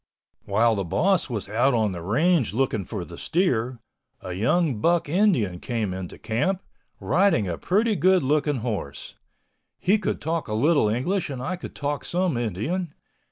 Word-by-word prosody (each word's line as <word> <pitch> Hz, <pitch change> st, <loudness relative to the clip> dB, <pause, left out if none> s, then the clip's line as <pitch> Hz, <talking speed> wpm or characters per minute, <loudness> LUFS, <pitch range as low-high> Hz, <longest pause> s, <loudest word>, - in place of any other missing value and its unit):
While 110 Hz, +3 st, +3 dB
the 100 Hz, -2 st, -1 dB
boss 180 Hz, -, +1 dB
was 110 Hz, -5 st, -3 dB
out 120 Hz, +5 st, +2 dB
on 110 Hz, -3 st, +1 dB
the 85 Hz, -2 st, -6 dB
range 130 Hz, -, +2 dB
looking 115 Hz, -6 st, 0 dB
for 100 Hz, -6 st, -5 dB
the 85 Hz, 0 st, -10 dB
steer, 130 Hz, -9 st, 0 dB, 0.4 s
a 90 Hz, -, -6 dB
young 125 Hz, -, +1 dB
buck 170 Hz, +2 st, +2 dB
Indian 145 Hz, -, +2 dB
came 110 Hz, -5 st, -2 dB
into 95 Hz, -2 st, -6 dB
camp, 145 Hz, -, -1 dB, 0.4 s
riding 165 Hz, -, +2 dB
a 85 Hz, -, -2 dB
pretty 215 Hz, +4 st, +1 dB
good 185 Hz, 0 st, +3 dB
looking 145 Hz, -1 st, +1 dB
horse. 100 Hz, -, -4 dB, 0.6 s
He 200 Hz, +4 st, +2 dB
could -, -, -2 dB
talk 165 Hz, +1 st, -2 dB
a 105 Hz, -, -2 dB
little 145 Hz, -1 st, +3 dB
English 155 Hz, -, -1 dB
and 135 Hz, -3 st, -5 dB
I 180 Hz, +9 st, -2 dB
could 180 Hz, -, -9 dB
talk 145 Hz, -2 st, -3 dB
some 180 Hz, -4 st, 0 dB
Indian. 120 Hz, -, -2 dB
130 Hz, 165 wpm, -25 LUFS, 110-175 Hz, 0.6 s, While